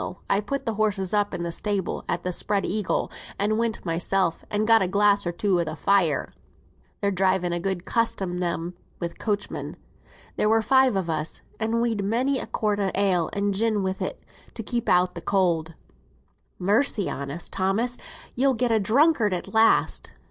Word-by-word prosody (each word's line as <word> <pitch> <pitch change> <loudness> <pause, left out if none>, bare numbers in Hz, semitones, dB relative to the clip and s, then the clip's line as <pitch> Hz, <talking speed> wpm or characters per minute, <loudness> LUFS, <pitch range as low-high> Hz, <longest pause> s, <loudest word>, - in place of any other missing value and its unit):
I 195 - +3
put 275 +7 -4
th' - - 0
horses 205 -3 0
up 205 -1 +2
in 170 0 -3
th' 170 - -3
stables 205 -1 -2
at - - -1
th' 180 - -2
Spread 200 +2 0
Eagle, 205 0 -1 0.3
and 215 +2 +1
went 230 -3 -2
mysel, 175 +1 +1 0.2
and 210 +1 0
got 225 0 +6
a 190 - +2
glass 200 0 +3
or - - 0
two 185 +1 +1
by 170 - +2
th' 155 - -7
fire. 185 -7 +2 0.7
They're 200 - +1
driving 185 -2 +1
a 175 - -1
good 190 0 -3
custom, 225 -6 0
them, 170 0 -2 0.3
wi' 170 - -2
coachmen. 205 +4 -4 0.6
There 210 - +2
were 225 0 +3
five 260 -1 +4
on 185 -3 -2
us, 160 -1 -3 0.2
and 225 +1 0
we'd 225 -4 0
many 255 +6 +1
a - - -4
quart 210 -2 -1
o' 195 -1 +1
ale, 190 -4 +2
and 200 0 0
gin 215 0 +1
wi' 190 0 0
it, - - -4 0.4
to 225 - -5
keep 235 +2 -2
out 180 -1 +2
cold." 170 -5 +1 0.8
"Mercy 205 +2 +1
on 140 0 -4
us, 165 +4 -5
Thomas; 210 +6 0 0.3
you'll 265 +1 +2
get 240 +1 0
a 225 - +4
drunkard 225 - +3
at 180 - -6
last!" 225 0 +3
200 Hz, 185 wpm, -25 LUFS, 180-220 Hz, 0.8 s, got